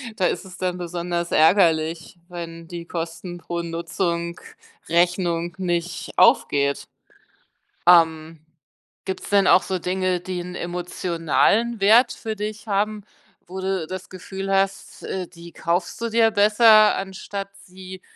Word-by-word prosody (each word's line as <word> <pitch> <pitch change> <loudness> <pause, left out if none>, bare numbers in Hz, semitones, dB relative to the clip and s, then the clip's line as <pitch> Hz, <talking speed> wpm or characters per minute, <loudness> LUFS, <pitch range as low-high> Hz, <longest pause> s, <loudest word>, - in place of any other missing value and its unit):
da 185 -3 +1
ist - - -3
es 185 - -11
dann 180 -1 -2
besonders 175 0 -3
ärgerlich, 165 -1 +2
wenn 165 -1 -8
die 170 -1 -7
Kosten 170 +1 -6
pro 170 0 -5
Nutzung 170 +1 -3 0.5
Rechnung 175 0 +1
nicht 175 -2 -3
aufgeht, 140 0 +3 1.0
ähm. 165 -2 +4 0.7
Gibt's 190 -1 -5
denn 200 -1 +4
auch - - +6
so 185 -1 -3
Dinge, 185 0 -1
die 180 0 -5
'n 180 +1 -8
emotionalen 180 +6 0
Wert 235 +5 +5
für 220 -1 -5
dich 215 +2 -6
haben, 210 +1 -1 0.5
wo 185 +2 -7
du 190 -4 -2
das 185 +1 -7
Gefühl 190 +1 -6
hast, 195 0 -1
äh, 185 -2 -4
die 170 -1 -13
kaufst 170 +3 -2
du 230 - -1
dir 225 0 +4
besser, 215 +1 +6
anstatt 195 +1 -6
sie 185 0 -11
180 Hz, 130 wpm, -22 LUFS, 170-195 Hz, 1.0 s, auch